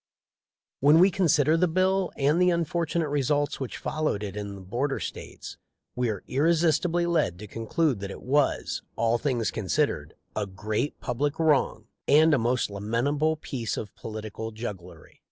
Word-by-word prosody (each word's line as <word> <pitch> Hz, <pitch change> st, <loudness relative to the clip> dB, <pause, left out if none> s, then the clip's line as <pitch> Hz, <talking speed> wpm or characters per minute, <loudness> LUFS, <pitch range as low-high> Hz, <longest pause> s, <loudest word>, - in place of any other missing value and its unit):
When 145 Hz, +3 st, +6 dB
we 185 Hz, +3 st, +6 dB
consider 160 Hz, -5 st, +3 dB
the 180 Hz, +2 st, +3 dB
bill 185 Hz, +2 st, +1 dB
and 150 Hz, +5 st, +2 dB
the 180 Hz, -, +5 dB
unfor 170 Hz, -1 st, 0 dB
tunate 160 Hz, -3 st, -1 dB
results 145 Hz, +1 st, 0 dB
which 130 Hz, -3 st, -5 dB
followed 155 Hz, -10 st, -2 dB
it 100 Hz, -1 st, -5 dB
in 100 Hz, -1 st, -5 dB
the 95 Hz, -, -10 dB
border 125 Hz, +9 st, -2 dB
States -, -, -7 dB, 0.4 s
we 125 Hz, -1 st, 0 dB
are 105 Hz, -4 st, -4 dB
irresistibly 165 Hz, +3 st, +2 dB
led 160 Hz, -, +1 dB
to 105 Hz, -, -8 dB
conclude 115 Hz, -, -1 dB
that 100 Hz, 0 st, -5 dB
it -, -, -9 dB
was, 140 Hz, +2 st, +1 dB
all 115 Hz, +1 st, +1 dB
things 120 Hz, -5 st, 0 dB
considered, 95 Hz, -, -1 dB, 0.2 s
a 105 Hz, -1 st, -1 dB
great 105 Hz, +8 st, -3 dB
public 140 Hz, +4 st, -1 dB
wrong 155 Hz, -4 st, +2 dB, 0.2 s
and 155 Hz, +2 st, +6 dB
a 140 Hz, -, +4 dB
most 120 Hz, -1 st, 0 dB
lamentable 125 Hz, +10 st, 0 dB
piece 125 Hz, -7 st, -4 dB
of 105 Hz, -, -6 dB
political 110 Hz, 0 st, -6 dB
jugglery. 95 Hz, -7 st, -8 dB
140 Hz, 160 wpm, -27 LUFS, 110-160 Hz, 0.4 s, When